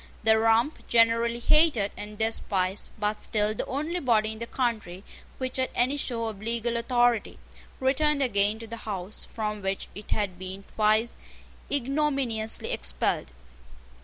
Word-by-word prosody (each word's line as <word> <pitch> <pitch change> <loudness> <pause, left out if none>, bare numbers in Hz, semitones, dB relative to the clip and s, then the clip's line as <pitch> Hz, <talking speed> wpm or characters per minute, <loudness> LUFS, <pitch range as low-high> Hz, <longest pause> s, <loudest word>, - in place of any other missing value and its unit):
The 220 0 +5
Rump, 225 +6 +2
generally 230 0 +3
hated 245 -5 +4
and 210 0 -8
despised, 200 -3 -1
but 210 0 -1
still 210 -1 0
the - - -4
only 310 +6 -2
body 220 -6 +2
in 220 - -8
the 235 - -5
country 215 -9 -2 0.3
which 255 0 -3
had 260 0 0
any 255 +4 +3
show 240 -5 -2
of 215 -3 -5
legal 235 +1 -1
authority, 240 -1 +1 0.4
returned 280 +2 +2
again 205 -3 +2
to 230 - -8
the 230 +1 -7
house 200 -2 -4
from 210 -2 -4
which 195 0 -3
it 205 +1 -10
had 190 -4 -1
been 190 +1 -6
twice 215 +2 +2 0.5
ignominiously 275 -5 0
expelled. 60 -1 -1
225 Hz, 145 wpm, -27 LUFS, 210-245 Hz, 0.5 s, The